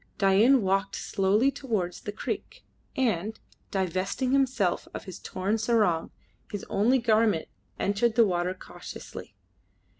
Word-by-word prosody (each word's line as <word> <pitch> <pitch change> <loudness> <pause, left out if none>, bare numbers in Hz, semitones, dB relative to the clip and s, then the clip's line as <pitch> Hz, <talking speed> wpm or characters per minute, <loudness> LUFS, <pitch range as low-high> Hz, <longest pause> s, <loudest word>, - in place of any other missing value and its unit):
Dain 215 +6 +5
walked 195 +1 +1
slowly 205 +7 +2
towards 220 -11 -3
the 205 - -5
creek, 205 - -5 0.3
and, 220 -4 0 0.3
divesting 190 +7 -1
himself 255 -9 +1
of - - -5
his 185 -2 -9
torn 200 +4 -2
sarong, 215 -7 +2 0.4
his 205 - -5
only 230 +7 +3
garment, 220 -7 +2 0.3
entered 210 +3 +1
the 230 -1 +6
water 180 -1 0
cautiously. - - -10
205 Hz, 120 wpm, -27 LUFS, 190-235 Hz, 0.4 s, the